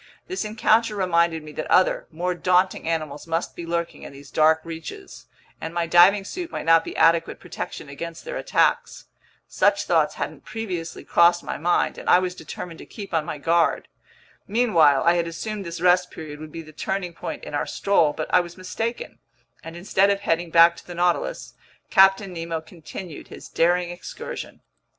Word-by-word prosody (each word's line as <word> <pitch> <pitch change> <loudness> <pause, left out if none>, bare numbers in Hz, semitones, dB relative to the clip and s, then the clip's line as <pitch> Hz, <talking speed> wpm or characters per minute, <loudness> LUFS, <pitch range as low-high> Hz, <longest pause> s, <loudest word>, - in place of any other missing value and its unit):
This 375 +1 -3
encounter 220 +1 +2
reminded 170 -4 +1
me 155 - -10
that 155 - -6
other, 185 - +3
more 175 +3 -2
daunting 180 -1 +1
animals 155 -2 -3
must 165 +1 -2
be 170 - -7
lurking 170 0 -3
in - - -9
these 140 0 -14
dark 160 0 +4
reaches, 170 - -9 0.3
and 160 +1 -6
my 170 -1 0
diving 180 +4 +5
suit 350 - -5
might - - -5
not 165 0 +5
be - - -7
adequate 165 0 +3
protection - - -7
against 165 +4 -8
their - - -5
attacks. - - 0 0.4
Such - - +2
thoughts - - +2
hadn't - - -5
previously 185 -7 -5
crossed 170 0 +4
my - - -5
mind, 175 +3 +1
and - - -4
I - - +8
was 180 0 -1
determined 175 -2 -8
to - - -10
keep 200 -4 -9
on 160 -2 +1
my 150 - -5
guard. 165 +3 +1 0.6
Meanwhile 175 - +4
I 170 - +5
had 170 -1 0
assumed 200 +3 -5
this 170 0 -6
rest 180 0 +4
period 150 -2 -9
would 155 0 -9
be 165 - -7
the 155 0 -14
turning 180 +2 -3
point - - -6
in - - -8
our 145 - -1
stroll, 170 -7 +2
but 155 +1 -4
I - - +7
was 175 0 -5
mistaken; 225 +6 -5 0.4
and 165 0 -9
instead 195 +2 +2
of 200 0 0
heading 170 -3 0
back 170 +1 +6
to - - -14
the 175 - -8
Nautilus, 175 - -1 0.4
Captain 195 0 +5
Nemo 165 -1 -4
continued 160 0 -10
his - - -11
daring 175 +1 +1
excursion. 470 - -8
170 Hz, 185 wpm, -23 LUFS, 165-185 Hz, 0.6 s, I